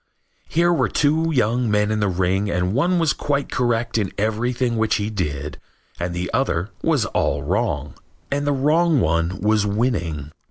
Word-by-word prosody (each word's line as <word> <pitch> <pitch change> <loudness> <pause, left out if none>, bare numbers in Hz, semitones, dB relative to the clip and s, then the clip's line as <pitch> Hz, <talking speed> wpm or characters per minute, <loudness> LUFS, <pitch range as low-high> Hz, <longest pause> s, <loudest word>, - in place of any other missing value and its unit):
Here 175 +2 +3
were 170 - +1
two 155 +3 +2
young 120 -3 +1
men 105 0 +2
in 110 - 0
the 105 - +1
ring 95 +2 0
and 90 +1 0
one 175 +8 +2
was 165 -4 +2
quite 140 -1 -2
correct 115 -2 0
in 100 -3 -2
everything 115 +3 0
which 110 -1 +2
he 105 +1 -2
did 75 -7 -4 0.4
and 85 0 -3
the 90 +1 -3
other 110 -7 0
was - - +2
all 70 0 -1
wrong. 75 - -1 0.4
And 145 +1 -1
the - - +3
wrong 150 +3 +3
one 85 0 0
was 105 0 +2
winning. 90 - -1
110 Hz, 170 wpm, -21 LUFS, 90-130 Hz, 0.4 s, Here